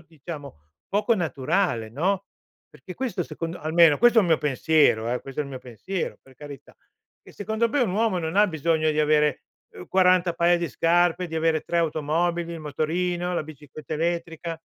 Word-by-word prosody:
diciamo, 155 - -10 0.3
poco 210 +3 +1
naturale, 155 - -1
no, 185 - -1 0.4
perché 180 - -11
questo 245 -6 -3
secondo 165 +1 -6
almeno 160 -1 +4
questo 240 -1 +5
è - - +6
un - - -1
mio 160 - +4
pensiero 145 -5 +2
eh, 125 - -2
questo 135 +2 -5
è - - -1
il 140 - -9
mio 130 - -6
pensiero, 145 - -5
per 135 -1 -20
carità. 145 0 -12 0.5
Che - - -16
secondo 220 +3 -1
me 285 +3 0
un 225 -7 +1
uomo 215 -3 +1
non 160 +2 -3
ha 210 0 +6
bisogno 160 -1 0
di 155 - -2
avere, 150 -2 +2 0.3
uhm, 90 - -10
40 185 -1 +3
paia 175 +1 +3
di 170 -2 -2
scarpe, 175 +1 +2
di 160 - -7
avere 160 -1 +1
3 170 - -3
automobili, 165 +2 -1
il 165 - -8
motorino, 175 +4 -2
la - - -1
bicicletta 150 0 -10
elettrica. 165 0 -3
165 Hz, 185 wpm, -24 LUFS, 150-180 Hz, 0.5 s, è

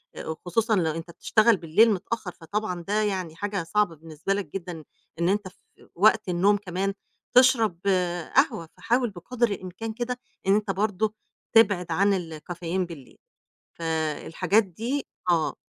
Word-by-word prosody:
آآ - - -7
وخصوصًا 180 +8 0
لو 165 -5 +1
أنت 165 +2 -6
بتشتغل 220 +4 +3
بالليل 180 +7 +4
متأخّر، 200 0 -4
فطبعًا 180 +2 -4
ده 210 +1 +1
يعني 185 -6 -2
حاجة 200 -1 -2
صعبة 175 0 +1
بالنسبة 160 +4 -3
لك 200 -1 -2
جدًا 175 -4 -6 0.4
إن 170 +1 +2
أنت 205 0 0
في 185 - -19
وقت 215 +2 +4
النوم 190 +4 +3
كمان 195 0 -2 0.4
تشرب 230 -8 +5 0.6
قهوة، 165 -2 +2
فحاول 240 0 +1
بقدر 235 +6 -1
الإمكان 200 +4 -5
كده 245 +2 -3 0.3
إن 195 - +6
أنت 210 -1 0
برضه 210 +2 0 0.4
تبعد 200 -6 +4
عن 200 +4 +3 0.3
الcaffeine 175 +2 -3
بالليل. 145 -7 -12 0.6
فالحاجات 160 +5 +1
دي 230 - -4 0.2
آه. 165 -3 +2
195 Hz, 140 wpm, -26 LUFS, 170-215 Hz, 0.6 s, إن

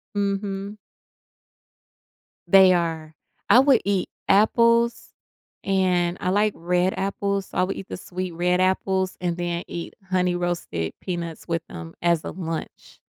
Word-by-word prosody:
Mhm. 200 0 -2 1.7
They 190 +1 +7
are. 160 -3 -2 0.3
I 245 - +8
would 270 -3 +5
eat 195 -2 0 0.2
apples, 230 +3 +3 0.5
and 180 -2 +1
I 180 - -1
like 205 +2 +2
red 180 +2 0
apples, 200 0 -2
so - - -8
I - - +4
would 190 +2 -2
eat 195 - -8
the - - -5
sweet, 185 0 -5
red 180 +2 +1
apples 190 0 0
and 175 -1 -1
then 175 0 -2
eat 170 - -6
Honey 180 -1 +1
Roasted 175 - -3
Peanuts 170 -3 -5
with 165 -1 -2
them 80 0 -9
as 170 -2 +2
a - - -5
lunch. 165 -3 -7
185 Hz, 140 wpm, -24 LUFS, 175-195 Hz, 1.7 s, I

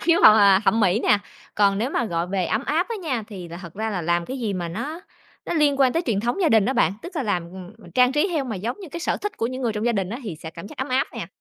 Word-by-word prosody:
khiếu 340 0 +3
hoặc, 215 0 +8
à, 195 -2 +6
thẩm 225 +2 +3
mỹ 200 +2 +3
nè. 210 - +4 0.4
Còn 200 -1 +3
nếu 245 +5 -1
mà 240 - 0
gọi 170 -4 -2
về 185 -1 -1
ấm 220 +5 -1
áp 325 +6 +1
á 460 - -3
nha, 255 -8 -1
thì 185 -5 -8
là 170 - -8
thật 170 -3 -10
ra 220 +2 -2
là 180 -4 -2
làm 170 +1 +1
cái 260 +8 -5
gì 220 -4 -2
mà 175 -2 -3
nó 305 - -5 0.5
nó - - -2
liên 295 -3 +3
quan 260 -2 +5
tới 330 - 0
truyền 205 -4 +1
thống 240 - -1
gia 330 - +4
đình 220 -5 +4
á 260 - +1
bạn, 180 -8 +2
tức 350 +1 -8
là 290 - 0
làm, 190 -6 0
ừm, 185 +1 -10
ừm, 175 -6 -15
trang 250 +7 +4
trí 295 +7 +2
theo 305 -6 0
mà 225 -5 -4
giống 235 - -4
như 375 - -8
cái 340 +4 -7
sở - - 0
thích 415 0 -5
của 230 - 0
những 255 +2 -5
người 230 -3 0
trong 210 +2 -2
gia 240 - +3
đình 195 -2 -1
á, 235 - -4
thì 195 -8 -6
sẽ 160 +1 -8
cảm 170 +3 -9
giác - - -12
ấm 260 - -2
áp 255 +1 +1
nè. - - -5
220 Hz, 330 wpm, -23 LUFS, 190-270 Hz, 0.5 s, hoặc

